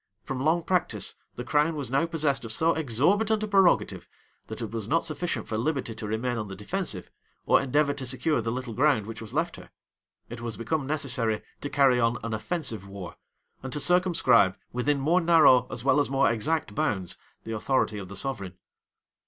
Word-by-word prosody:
From 130 -1 -4
long 165 +3 +2
practice, 180 0 0 0.2
the 125 - -5
crown 150 +5 +1
was 140 -5 -4
now 140 +5 +2
possessed 150 -5 0
of 115 - -4
so 160 +8 +2
exorbitant 195 - +1
a - - -1
prerogative, 195 -3 +2 0.4
that - - -7
it - - -5
was 110 -3 -5
not 165 +6 +2
sufficient 165 +2 -3
for 110 - -2
liberty 135 -2 -1
to 110 -1 -6
remain 115 +3 -2
on 105 -2 -4
the 95 - -7
defensive, 105 - -3 0.3
or - - +4
endeavor 145 +2 +1
to 140 -2 -6
secure 130 +2 0
the 115 +1 -2
little 125 -1 -4
ground 130 -3 +2
which 115 0 -8
was 110 -1 -8
left 165 +5 -1
her: - - -13 0.6
it 120 0 -8
was 115 -2 -5
become 140 +4 -2
necessary 125 -7 0 0.2
to 145 - -4
carry 135 -3 +4
on 115 0 +2
an 115 -1 -3
offensive 110 - -2
war, 95 -2 -8 0.5
and 130 - -6
to 150 - -2
circumscribe, 160 - +3 0.2
within 140 +4 0
more 165 +7 +2
narrow, 155 -8 +5
as 120 - -7
well 135 +1 +3
as 145 - +1
more 135 -3 +3
exact 140 +1 -1
bounds; 95 -4 -1 0.3
the 115 - -5
authority 110 -1 0
of 95 - -7
the 100 - -9
sovereign. 100 -10 -4
130 Hz, 195 wpm, -27 LUFS, 115-155 Hz, 0.6 s, narrow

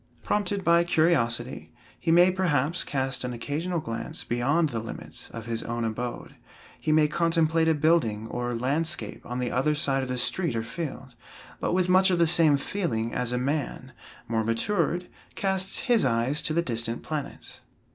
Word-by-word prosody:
Prompted 200 -1 -1
by 170 0 +4
curiosity, 135 -8 +1 0.3
he 165 - 0
may, 175 +2 +6
perhaps, 170 -4 0
cast 135 -2 -2
an 125 0 -3
occasional 155 +9 -3
glance 115 -6 -4
beyond 145 +7 +1
the 115 - -3
limits 115 - -9
of 115 -1 -8
his 115 -1 -2
own 120 0 -3
abode. 120 +2 -4 0.5
He 155 - -1
may 155 0 +5
contemplate 165 0 +2
a 160 - +4
building 145 -9 +2
or 120 +1 -3
landscape 135 -1 -2
on 125 - -4
the 125 -1 -2
other 145 +5 +1
side 135 -2 +2
of 130 - -4
the 125 - -2
street 165 +3 0
or 115 - -1
field, 130 0 -6 0.5
but - - -1
with 185 0 +2
much 185 +1 +5
of 180 - +2
the 170 - +4
same 160 -3 +6
feeling 120 - -2
as 125 -1 -1
a 125 - 0
man, 130 -1 -2 0.4
more 110 -1 0
matured, 170 - 0 0.3
casts 190 -1 0
his 240 -4 +2
eyes 125 +4 +1
to 155 - -2
the 170 - +2
distant 115 -3 -2
planets. 150 -3 -6
145 Hz, 175 wpm, -26 LUFS, 120-170 Hz, 0.5 s, may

